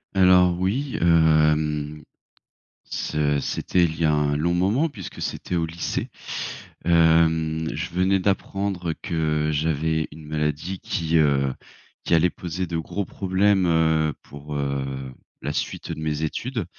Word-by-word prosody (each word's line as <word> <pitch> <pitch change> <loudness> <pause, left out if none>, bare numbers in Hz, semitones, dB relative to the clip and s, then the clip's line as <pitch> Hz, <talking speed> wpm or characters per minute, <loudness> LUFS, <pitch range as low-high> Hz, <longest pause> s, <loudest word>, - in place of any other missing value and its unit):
Alors 90 -1 +5
oui, 125 +9 -1
hem, 75 -2 +3 0.8
ce 75 -1 -1
c'était 90 +5 0
il 80 -1 -1
y 80 - +2
a 75 - +3
un 75 -1 +1
long 85 +3 +1
moment 105 - +2
puisque 95 - -9
c'était 90 - -3
au 85 - +1
lycée. 85 +1 -3 0.8
Hem, 80 -1 +3
je - - -4
venais 95 +2 +2
d'apprendre 95 -2 -1
que 80 -5 0
j'avais 80 +1 0
une 75 0 -11
maladie 75 +4 -2
qui, 80 -1 0
heu, 70 -3 +3 0.5
qui - - +1
allait 85 +2 +4
poser 90 +1 -4
de 85 0 -2
gros 100 +5 -3
problèmes, 95 +1 +1
heu, 80 -2 +2
pour, 75 +1 -9
heu, 70 -2 -3 0.3
la 75 - -2
suite, - - -3
heu, - - -3
de - - -9
mes 75 0 -2
études. 115 - -3
80 Hz, 145 wpm, -24 LUFS, 75-90 Hz, 0.8 s, Alors